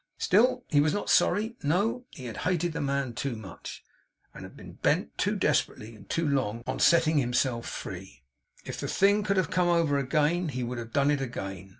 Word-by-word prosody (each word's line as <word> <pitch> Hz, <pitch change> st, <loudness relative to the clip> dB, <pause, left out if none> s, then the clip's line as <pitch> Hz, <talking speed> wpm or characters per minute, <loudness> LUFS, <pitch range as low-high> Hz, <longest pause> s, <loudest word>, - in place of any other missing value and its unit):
Still 230 Hz, +7 st, +3 dB
he 145 Hz, -2 st, +4 dB
was 150 Hz, +1 st, +1 dB
not 205 Hz, -, -1 dB
sorry. 220 Hz, +5 st, +2 dB
No. 200 Hz, -, 0 dB
He 130 Hz, -, -11 dB
had 115 Hz, -, -6 dB
hated 175 Hz, -2 st, -1 dB
the -, -, -3 dB
man 140 Hz, -3 st, -1 dB
too 135 Hz, 0 st, -3 dB
much, 100 Hz, -6 st, -9 dB, 0.5 s
and -, -, -10 dB
had -, -, -11 dB
been -, -, -11 dB
bent, -, -, 0 dB
too -, -, 0 dB
desperately 110 Hz, +1 st, -1 dB
and 100 Hz, -2 st, -16 dB
too 165 Hz, -1 st, 0 dB
long, 120 Hz, -5 st, -1 dB
on -, -, -3 dB
setting 165 Hz, -3 st, +4 dB
himself 125 Hz, -1 st, 0 dB
free. 95 Hz, -7 st, -8 dB, 0.4 s
If -, -, -6 dB
the -, -, -3 dB
thing 200 Hz, +2 st, +3 dB
could 200 Hz, -1 st, 0 dB
have 185 Hz, -4 st, +1 dB
come 180 Hz, 0 st, +2 dB
over 165 Hz, -5 st, +2 dB
again, 155 Hz, +6 st, +1 dB
he 130 Hz, -2 st, -3 dB
would 120 Hz, 0 st, -4 dB
have 115 Hz, -1 st, -8 dB
done 140 Hz, +2 st, +2 dB
it 145 Hz, -2 st, 0 dB
again. 95 Hz, -7 st, -6 dB
145 Hz, 205 wpm, -28 LUFS, 120-175 Hz, 0.5 s, he